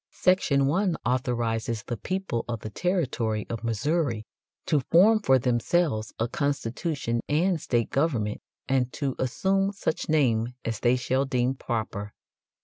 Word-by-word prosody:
Section 165 -7 +3
1 180 +5 +1
authorizes 120 -2 -1
the 120 - -4
people 185 - -3
of 115 -3 -4
the 110 - -6
territory 125 - -1
of 115 - -4
Missouri 115 0 0 0.4
"to 150 - +2
form 190 - +5
for 135 -11 +4
themselves 125 -1 +1
a 115 - 0
constitution 140 -2 -2
and 165 +2 +2
state 120 -2 0
government, 130 -8 0 0.3
and 130 -2 +1
to 140 -3 -2
assume 195 +10 +1
such 195 -6 -2
name 125 -6 +2
as 115 -1 -2
they 120 +1 +3
shall 130 +2 0
deem 125 -1 +1
proper." 110 -5 -4
130 Hz, 140 wpm, -26 LUFS, 115-160 Hz, 0.4 s, form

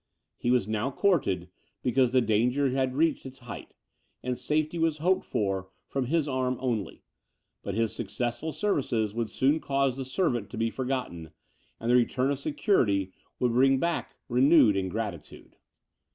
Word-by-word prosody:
He 120 - -1
was 125 -5 +3
now 110 +4 -1
courted, 135 - +1 0.4
because 125 -1 +3
the 130 0 +4
danger 125 +5 +2
had 130 -1 0
reached 160 +1 +2
its 130 0 -10
height, 120 -3 -10 0.5
and 125 0 -1
safety 155 +5 -1
was 165 -2 +1
hoped 180 +5 +2
for 95 -2 -2 0.2
from 135 -3 -2
his 160 +1 +1
arm 130 -2 -1
only; 115 -8 -3 0.6
but 100 - -4
his 115 -1 0
successful 120 +7 -3
services 125 - 0
would 115 -1 -2
soon 140 +4 +2
cause 135 -3 0
the 135 - -3
servant 125 - -1
to - - -8
be 115 0 0
forgotten, 125 -12 -3 0.5
and 115 +1 0
the - - +5
return 125 +2 +2
of 140 - -2
security 110 - +1 0.2
would 125 -1 +1
bring 135 +2 +4
back 170 +5 -2
renewed 125 -3 +5
ingratitude. 95 -2 -5
125 Hz, 155 wpm, -28 LUFS, 110-140 Hz, 0.6 s, the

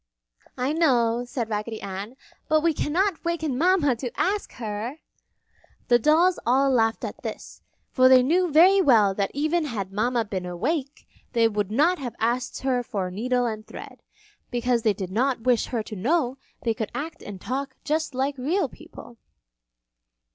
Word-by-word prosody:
"I 260 +3 0
know," 245 -7 +2
said 240 -2 -3
Raggedy 215 +1 -4
Ann, 200 +5 -6 0.3
"but 310 0 +4
we 330 0 +2
cannot 340 +5 0
waken 320 -5 -1
Mama 320 -3 +3
to 245 +1 -4
ask 405 +2 -1
her!" 220 +3 -5 0.9
The 240 -1 +5
dolls 330 +8 +3
all 270 +3 +3
laughed 225 -3 +1
at - - -7
this, - - -7 0.3
for 255 -1 +5
they 255 -1 +7
knew 350 +6 +2
very 370 +6 +6
well 220 - +4
that 195 0 -1
even 310 +3 +1
had 205 -8 -4
Mama 235 +2 0
been 190 -3 -4
awake, 275 - -3 0.3
they 230 -1 +4
would 210 -3 -2
not 310 +11 +2
have 250 -4 -5
asked 240 +2 -1
her 260 -2 +1
for 200 -7 -4
needle 245 +5 0
and 215 -2 -4
thread, - - -10 0.5
because 245 0 0
they 220 -2 +2
did 190 -2 -6
not 250 +4 0
wish 245 -2 +2
her 230 -3 -2
to 215 - -8
know 260 - 0 0.2
they 230 - +1
could 220 -2 -4
act 320 +3 -5
and 200 -2 -8
talk 265 +6 -4
just 310 -2 -1
like 270 +2 0
real 330 +10 0
people. 240 - -14
250 Hz, 170 wpm, -25 LUFS, 225-305 Hz, 0.9 s, they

